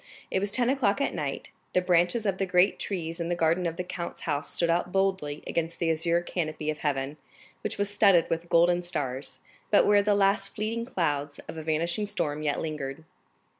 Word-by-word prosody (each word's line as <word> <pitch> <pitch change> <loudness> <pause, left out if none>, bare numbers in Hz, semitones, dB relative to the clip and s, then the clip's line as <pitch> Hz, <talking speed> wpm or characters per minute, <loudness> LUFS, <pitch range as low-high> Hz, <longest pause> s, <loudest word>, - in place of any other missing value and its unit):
It - - +2
was 200 +1 0
ten 240 +4 +1
o'clock 265 -5 +1
at 280 - 0
night; 145 -5 -4 0.2
the - - +4
branches 180 +5 +2
of 195 -2 0
the 195 - 0
great 180 +1 +3
trees 165 -3 -3
in 170 0 -2
the 175 - +1
garden 170 +1 +2
of 165 - -3
the 180 - -3
count's 175 -1 -6
house 145 -2 -2
stood 170 - +2
out 175 +1 0
boldly 190 -7 0
against 165 0 -2
the 165 -2 +1
azure 170 +2 +1
canopy 155 -3 -2
of 150 - -7
heaven, 140 0 -2 0.4
which - - -3
was 205 0 +1
studded 200 -4 +4
with 165 +1 -3
golden 175 +1 +4
stars, 135 -6 -3 0.3
but 205 - +5
where 205 0 +5
the 205 0 +2
last 195 0 +2
fleeting 225 +2 -2
clouds 145 - -1
of - - -7
a 160 - -5
vanishing 170 +6 -1
storm 150 -6 -2
yet 150 -2 0
lingered. 150 -1 -4
170 Hz, 205 wpm, -28 LUFS, 155-195 Hz, 0.4 s, but